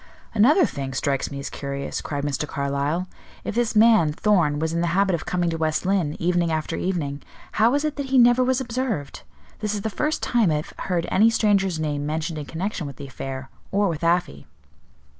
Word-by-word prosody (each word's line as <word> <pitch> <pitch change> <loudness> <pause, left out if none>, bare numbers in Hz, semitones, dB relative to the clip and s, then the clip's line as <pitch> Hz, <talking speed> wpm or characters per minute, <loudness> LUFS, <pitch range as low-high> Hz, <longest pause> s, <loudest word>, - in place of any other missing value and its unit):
"Another 285 - +5
thing 135 - -5
strikes 135 0 0
me 140 - -7
as 140 - -5
curious," 140 0 -4
cried 145 -1 -4
Mr. 145 +1 -2
Carlyle. 140 +6 -1 0.4
"If - - -3
this 235 0 0
man, 215 -7 +5
Thorn, 165 -4 +2
was 160 +2 -1
in 170 - 0
the 175 - +1
habit 195 -1 +3
of 170 - -3
coming 175 -2 0
to 165 - -3
West 155 +1 0
Lynne, 185 -6 +1
evening 175 -1 +1
after 155 -1 -2
evening, 150 -7 -2 0.3
how 220 +2 +4
was 285 +4 +1
it 305 -1 -2
that 280 -1 -3
he 265 0 +2
never 245 +1 +6
was 260 0 +1
observed? 235 - -3 0.4
This 210 -1 -2
is 205 - -3
the 220 - -3
first 300 +8 -1
time 235 -6 +2
I 155 - +2
have 150 - -4 0.2
heard 175 -2 +1
any 220 +4 +5
stranger's 200 -6 +2
name 145 -2 -2
mentioned 155 +1 -2
in 145 - -7
connection 175 -1 -3
with 140 - -8
the 140 - -8
affair, 135 0 -7 0.2
or 200 +1 +2
with 160 -1 -4
Afy." 170 - 0
170 Hz, 210 wpm, -23 LUFS, 145-215 Hz, 0.4 s, never